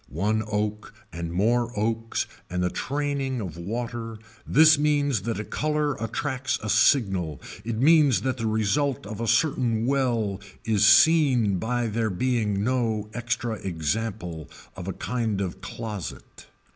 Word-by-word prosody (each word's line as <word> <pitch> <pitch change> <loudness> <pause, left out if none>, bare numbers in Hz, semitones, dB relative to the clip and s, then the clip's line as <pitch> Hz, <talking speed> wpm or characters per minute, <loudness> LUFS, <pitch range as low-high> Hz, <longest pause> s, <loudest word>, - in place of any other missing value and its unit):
One 105 - 0
oak 105 0 -3 0.2
and 85 0 -4
more 120 +6 +1
oaks 115 +1 -1 0.2
and 90 0 -1
the 90 - 0
training 140 -2 -2
of 90 -8 -5
water 115 +5 -5 0.3
this 155 +1 +6
means 145 -6 +2
that 115 - -2
a - - -2
color 150 +3 -1
attracts 130 +3 -2
a 110 - -1
signal 95 - +2 0.2
it 115 0 -3
means 145 -1 +5
that 130 -1 -1
the 115 -1 -2
result 110 +4 0
of 105 +1 -6
a 115 - -2
certain 120 -2 +2
well 120 -7 0 0.2
is 105 -2 +3
seen 120 - +5
by 120 +3 -1
there 110 0 -1
being 105 -1 0
no 110 -4 -1
extra 120 -1 -2
example 90 -1 -3 0.3
of 90 - -7
a 95 - -2
kind 115 -4 -2
of 95 -1 -4
closet. 105 -3 -7
115 Hz, 145 wpm, -25 LUFS, 100-130 Hz, 0.3 s, this